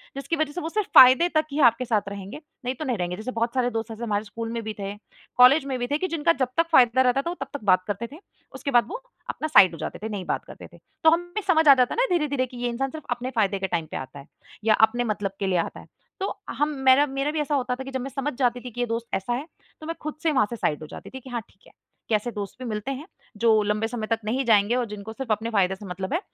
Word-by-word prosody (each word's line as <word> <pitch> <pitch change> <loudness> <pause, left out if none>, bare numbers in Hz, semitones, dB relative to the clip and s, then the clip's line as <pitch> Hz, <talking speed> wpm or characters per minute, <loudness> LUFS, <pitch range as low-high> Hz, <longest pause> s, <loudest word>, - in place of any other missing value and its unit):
जिसकी 275 +5 -2
वजह 310 -2 -1
से 355 - -5
वो 320 - -3
सिर्फ़ 425 +3 -1
फ़ायदे 260 +7 +9
तक 310 - +3
ही 290 - -2
आपके 235 +2 -6
साथ 210 -4 0
रहेंगे, 200 +8 -8 0.2
नहीं 255 +1 -1
तो 310 - -5
नहीं 250 -4 -1
रहेंगे। 180 0 -2
जैसे 220 +6 -5
बहुत 230 0 -1
सारे 255 -2 +1
दोस्त 225 0 -3
ऐसे 225 +1 -7
हमारे 210 -2 -1
स्कूल 225 +2 -6
में 230 0 -3
भी 220 0 -4
थे, 200 0 -4 0.4
कॉलेज 265 +4 +7
में 265 -2 -2
भी 245 - -2
थे 290 - 0
कि 370 - -1
जिनका 335 -1 +2
जब 260 - +2
तक 330 0 +3
फ़ायदा 255 -3 +5
रहता 260 +1 +3
था 335 - -4
वो 350 - -4
तब - - -11
तक 285 - -6
बात 185 -2 +4
करते 205 +3 -3
थे। 300 - -11 0.4
उसके 280 - -4
बाद 240 -2 +5
वो 470 +8 -6 0.3
अपना 310 - -3
साइड 190 - +7
हो - - -7
जाते - - -5
थे, 220 - -3
नहीं 200 -3 -5
बात - - -2
करते - - -11
थे। - - -14 0.3
तो 320 - +8
हमें 330 - +4 0.2
भी 425 - 0
समझ 320 -3 +4
आ 280 - +11
जाता 250 -2 +2
है - - -4
ना - - +4
धीरे-धीरे 285 -5 0
कि 250 -1 -12
ये 245 0 -1
इंसान 265 +3 -2
सिर्फ़ 310 0 -9
अपने 245 +1 -2
फ़ायदे 200 -3 +1
के 190 - -1
टाइम 170 -3 -1
पे - - -3
आता 135 +2 -8
है 140 - -12 0.4
या 220 0 +4
अपने 240 +2 -2
मतलब 210 -4 -2
के 195 - -1
लिए 185 - +1
आता - - -3
है। - - -13 0.3
तो 385 - -2 0.2
हम 295 +1 0 0.2
मेरा 265 +3 +7
मेरा 275 +2 -2
भी 310 - -2
ऐसा 295 0 -1
होता 250 -2 -1
था 265 - -7
कि 270 - -8
जब 260 -1 -3
मैं 270 - -5
समझ 275 +2 -3
जाती 245 -2 +1
थी 250 - -8
कि 245 - -9
ये 245 - +2
दोस्त 230 +1 -3
ऐसा 195 +5 -1
है 260 +5 -3 0.4
तो 310 - -8
मैं 330 - -3
खुद 305 0 -5
से 320 - +3
वहाँ 260 -6 +3
से 235 - -4
साइड 150 -9 -1
हो 155 - -8
जाती - - -10
थी 265 - -8
कि 260 - -13
हाँ 240 -2 -3
ठीक 190 - -25
है। - - -18 0.4
कि 220 - +3
ऐसे 215 +3 -2
दोस्त 205 -3 -6
भी 255 - -6
मिलते 215 +4 -3
हैं 275 +3 -6 0.3
जो 220 -1 +4
लंबे 210 +2 0
समय 225 -2 -4
तक 225 0 0
नहीं 255 +5 -1
जाएँगे 220 0 +4
और 250 -1 0
जिनको 210 +1 -8
सिर्फ़ 250 0 -5
अपने 220 +2 0
फ़ायदे 190 -3 +2
से 200 +1 -12
मतलब 190 +5 -5
है 335 - +2
245 Hz, 305 wpm, -25 LUFS, 215-275 Hz, 0.4 s, आ